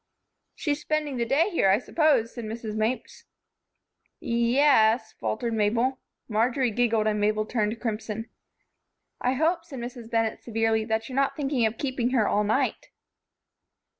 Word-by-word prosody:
"She's 295 -2 -2
spending 300 -4 -1
the 235 -1 -1
day 315 - +2
here, 260 - +3
I 195 - +5
suppose," 270 -3 +1
said 235 -3 -6
Mrs. 220 0 -5
Mapes. 220 +4 -2 0.9
"Ye 235 +2 0
es," 250 -5 +4
faltered 230 +1 -2
Mabel. 230 +5 +1 0.3
Marjory 240 +3 +1
giggled, 225 -1 +1
and 210 -1 +1
Mabel 215 +1 +1
turned 220 0 -1
crimson. 225 -1 -4 0.9
"I 250 - +1
hope," 330 +5 +1
said 295 -5 -10
Mrs. 240 -1 -7
Bennett, 225 -1 0
severely, 225 -1 0
"that 220 0 -1
you're 255 - -7
not 275 0 +1
thinking 270 -5 +1
of 220 +1 -5
keeping 255 -3 -1
her 215 -3 +3
all 210 - +2
night." 210 +1 0
235 Hz, 150 wpm, -26 LUFS, 220-265 Hz, 0.9 s, I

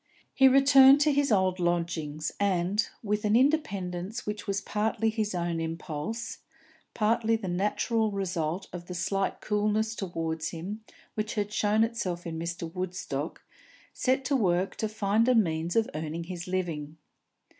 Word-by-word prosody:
He 265 - +6
returned 275 +1 +7
to 300 0 +4
his 280 -2 +2
old 190 -2 +2
lodgings, 165 -3 -1
and, 195 +1 +1 0.2
with 210 0 -1
an 210 0 +3
independence 210 - 0
which 210 +1 -5
was 200 0 0
partly 220 +2 0
his 215 -3 -2
own 170 -1 -1
impulse, 165 +7 -4 0.6
partly 225 +1 +2
the 220 -4 -4
natural 210 +5 0
result 185 -3 -2
of 175 -1 -7
the 180 - -6
slight 195 +2 -1
coolness 215 +1 0
towards 165 -5 -3
him 195 +6 -6 0.3
which 215 0 -3
had 210 -1 -2
shown 215 +1 +3
itself 195 -7 -2
in 165 -1 -4
Mr. 165 0 -5
Woodstock, 180 -5 -4 0.5
set 265 +1 0
to 275 - +1
work 185 -5 +1
to 220 - -1
find 215 +1 +1
a 255 - +5
means 170 -5 +1
of 225 -1 +3
earning 160 +2 -4
his 175 +1 -6
living. 165 -5 -3
195 Hz, 150 wpm, -28 LUFS, 175-220 Hz, 0.6 s, returned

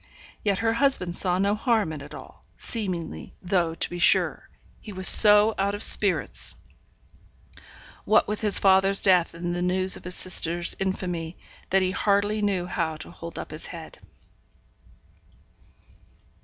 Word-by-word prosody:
Yet 200 -2 -1
her 225 - +1
husband 235 -9 +2
saw 180 -1 +2
no 200 +2 0
harm 215 - -1
in 150 - -9
it 140 - -12
all, - - -15
seemingly; 175 - -5
though, 175 -3 -2
to - - -1
be 175 - -9
sure, 175 - +1 0.3
he 215 - -12
was 185 -1 +1
so 210 0 +7
out 200 +1 -1
of 205 - -4
spirits, 200 -3 +2 1.5
what 215 - +1
with 210 +1 -4
his 210 -2 +4
father's 195 0 +3
death 180 -3 +2
and 175 +1 -5
the 175 - -4
news 185 +1 +1
of - - -16
his 180 0 -4
sister's 175 -1 0
infamy, 180 -3 -5 0.3
that 190 0 +1
he 185 - -2
hardly 205 +2 -1
knew 195 -4 -2
how 165 -3 -4
to 155 - -10
hold 170 -1 -10
up - - -8
his 155 - -5
head. 165 -2 -12
185 Hz, 155 wpm, -23 LUFS, 175-205 Hz, 1.5 s, so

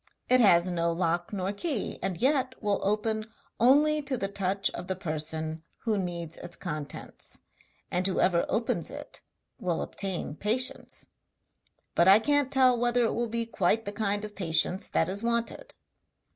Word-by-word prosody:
It 255 0 +6
has 180 -7 +6
no 170 -2 0
lock 170 +2 -1
nor 195 -1 -2
key, 265 - -2
and 190 -3 -2
yet 260 0 +2
will 205 -2 0
open 215 +2 -1 0.3
only 295 +6 +5
to 275 -2 -1
the 195 - -1
touch 195 0 0
of 180 - -7
the 190 - -1
person 160 -2 -3 0.2
who 225 -3 +1
needs 170 -4 -4
its 175 - -7
contents 150 -5 -6 0.5
and 180 +1 +1
whoever 180 -2 +2
opens 230 +2 0
it - - -8 0.4
will 175 -3 -1
obtain 190 -6 -4
patience; 230 +8 0 0.9
but 170 - +4
I 195 +2 +9
can't 285 +3 +1
tell 260 -2 +5
whether 240 0 +2
it 225 - +1
will 240 0 -1
be 230 +1 -1
quite 225 0 +1
the 205 - -3
kind 205 0 -1
of 210 - -9
patience 180 +1 +1
that 160 - +1
is 195 +2 -2
wanted.' 235 - -2
200 Hz, 160 wpm, -28 LUFS, 175-235 Hz, 0.9 s, I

